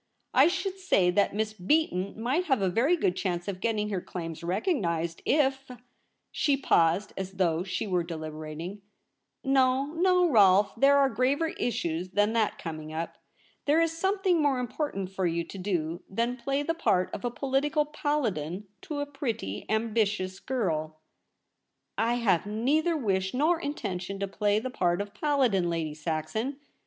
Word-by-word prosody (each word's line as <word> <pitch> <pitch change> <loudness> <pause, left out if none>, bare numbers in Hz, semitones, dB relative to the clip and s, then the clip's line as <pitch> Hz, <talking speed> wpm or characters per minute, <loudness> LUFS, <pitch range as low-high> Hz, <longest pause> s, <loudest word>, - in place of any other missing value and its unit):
I 270 +4 +7
should 375 +2 -2
say 190 - +3
that 200 +1 +2
Miss 215 0 -1
Beaton 200 - 0
might 265 +10 0
have 265 -7 +2
a 190 -1 +1
very 275 - +3
good 180 - +1
chance 175 -2 -2
of 195 -2 -4
getting 215 -2 0
her 195 -3 -2
claims 165 -2 -6
recognised 170 - -1
if 270 -2 +2 0.3
' - - -44 0.3
she 285 -2 +1
paused 180 -5 +2
as 190 0 -5
though 175 -3 +1
she 185 +3 -3
were 180 -3 +1
deliberating. 160 +3 -6 0.3
' - - -54
No, 260 +1 +3
no, 360 +1 +3
Rolfe; 200 - +5
there 275 +4 +5
are 280 -1 +5
graver 275 +5 +1
issues 185 - -2
than 205 +2 +2
that 225 -2 +1
coming 155 -2 -6
up. 165 +1 -5 0.5
There 295 +3 +4
is 330 -1 +1
something 380 -1 +1
more 285 -3 +2
important 245 -6 -3
for 190 -2 0
you 170 0 -1
to 180 - -10
do 175 -3 -2
than 235 +5 -1
play 275 +3 -1
the 330 - 0
part 185 - +1
of 240 +3 -4
political 290 +3 +1
paladin 225 - -2 0.2
to 310 -6 -4
a - - -1
pretty 245 - -4
ambitious 215 -4 0
girl.' 155 -11 -2 0.5
* - - -54 0.3
I 230 +2 +2
have 205 -7 +1
neither 290 +10 +1
wish 190 -5 -1
nor 320 +5 +2
intention 195 - -4
to 200 - -1
play 205 +1 +1
the 250 +4 -3
part 175 -6 +1
of 205 0 -4
paladin, 255 - +1
Lady 165 -2 -2
Saxon. 160 - -3
210 Hz, 165 wpm, -28 LUFS, 180-280 Hz, 0.5 s, I